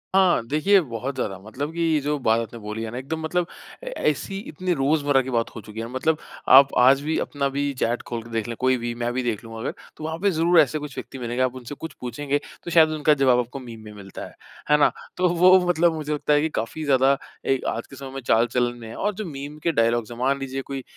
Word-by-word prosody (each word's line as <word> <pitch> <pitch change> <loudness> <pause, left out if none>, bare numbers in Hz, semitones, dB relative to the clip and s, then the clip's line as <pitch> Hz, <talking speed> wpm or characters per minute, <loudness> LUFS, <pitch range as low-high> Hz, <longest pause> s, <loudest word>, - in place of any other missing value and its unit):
हाँ। 185 -11 +4
देखिए 155 +9 +4
बहुत 130 0 -5
ज़्यादा 95 -2 -3
मतलब 135 +9 -5
कि 165 -2 +1
जो 150 0 0
बात 110 +1 +4
आपने 115 0 -6
बोली 105 +1 -5
है 110 - -4
ना 120 - -6
एकदम 140 +5 -4
मतलब 175 +2 0 0.4
अ, - - -8
ऐसी 195 - -1
इतनी 180 +3 -2
रोज़मर्रा 145 -1 +2
की 130 - -6
बात 115 -2 0
हो 110 - -6
चुकी 105 +2 -9
है। 115 - -4
मतलब 150 +5 0 0.3
आप 135 +1 +8
आज 135 +3 +6
भी 155 +2 -1
अपना 140 -1 -1
भी 140 +1 -1
चैट 120 +1 0
खोल 120 -1 -4
के 115 - -13
देख 115 -1 -2
ले। 115 - -4
कोई 130 0 +4
भी 120 0 -3
मैं 120 0 -2
भी 130 0 -1
देख 115 -1 -2
लूँ 115 0 -9
अगर। - - -3 0.2
तो 155 - -9
वहाँ 160 +1 -3
पे 200 +1 +2
ज़रूर 170 +1 +4
ऐसे 155 +2 0
कुछ 145 -2 -8
व्यक्ति 135 - -7
मिलेंगे। 120 +1 -2
आप 130 0 -1
उनसे 130 +3 -8
कुछ 160 +3 -7
पूछेंगे, 140 +4 -2 0.2
तो 170 - -6
शायद 160 -1 +6
उनका 155 -1 +3
ज़वाब 130 -3 +3
आपको 125 +3 -4
मीम 120 -3 -10
में 105 - -10
मिलता 100 -2 -9
है। - - -13 0.3
है 150 - +6
ना? 145 - +4 0.3
तो 180 0 +3
वो 180 +2 +6
मतलब 170 -1 +3
मुझे 150 -1 -3
लगता 150 0 +1
है 145 - +4
कि 160 - 0
काफ़ी 135 +8 -4
ज़्यादा 135 -1 +4 0.3
अ, 135 - +2
आज 115 - -3
के 135 - -12
समय 135 0 -8
में 135 - -5
चाल-चलन 120 +1 +1
में 115 - -9
है। 115 - -8
और 210 +1 -1
जो 215 - -4
मीम 145 -2 -7
के 170 - +2
डायलॉग्ज़ 115 -3 +1
है। 120 - -11
मान 135 +2 +1
लीजिए 135 0 -4
कोई 135 -1 -6
135 Hz, 260 wpm, -24 LUFS, 120-155 Hz, 0.4 s, आप